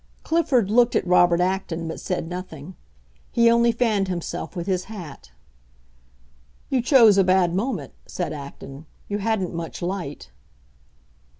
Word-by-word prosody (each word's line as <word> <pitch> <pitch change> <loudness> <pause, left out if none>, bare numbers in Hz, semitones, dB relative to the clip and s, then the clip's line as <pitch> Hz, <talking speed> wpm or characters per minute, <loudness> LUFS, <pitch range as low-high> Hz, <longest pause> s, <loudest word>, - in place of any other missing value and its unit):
Clifford 265 - +1
looked 240 +1 +4
at - - +1
Robert 175 -1 +4
Acton, 180 -2 -1
but 160 - -5
said 180 -3 -3
nothing; 180 -2 -8 0.6
he 235 0 +4
only 235 0 +4
fanned 220 -4 0
himself 175 +1 -5
with 170 -1 -4
his 185 -2 -1
hat. 170 - -10 1.4
"You 260 - +1
chose 230 -6 +6
a - - +6
bad 185 -2 +3
moment," 195 - -3
said 175 - -4
Acton; 140 +1 -10 0.2
"you 205 0 -3
hadn't 200 -4 -1
much 165 -1 -6
light." 175 - -5
185 Hz, 135 wpm, -23 LUFS, 170-220 Hz, 1.4 s, chose